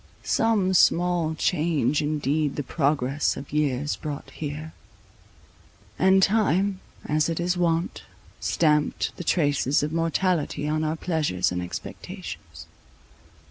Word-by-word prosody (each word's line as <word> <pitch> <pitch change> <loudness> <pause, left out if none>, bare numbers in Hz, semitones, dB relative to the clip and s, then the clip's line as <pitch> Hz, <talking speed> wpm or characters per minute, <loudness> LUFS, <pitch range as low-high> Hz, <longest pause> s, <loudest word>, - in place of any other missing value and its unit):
Some 210 -5 +2
small 175 -2 +3
change 155 -4 +1
indeed 150 -1 0
the 145 - -2
progress 140 -1 0
of 140 - -9
years 145 -1 0
brought 150 -2 -6
here; 155 +1 -6 1.3
and 190 +1 +5
time, 200 -2 +2 0.3
as 155 +1 +1
it 165 - -2
is 175 +1 0
wont, 170 -1 0 0.4
stamped 150 -2 +1
the - - -5
traces 145 -4 +2
of 150 +1 -2
mortality 165 -2 0
on 155 +1 0
our 155 +1 0
pleasures 155 - 0
and 90 0 -2
expectations. 90 0 -8
155 Hz, 115 wpm, -25 LUFS, 145-175 Hz, 1.3 s, and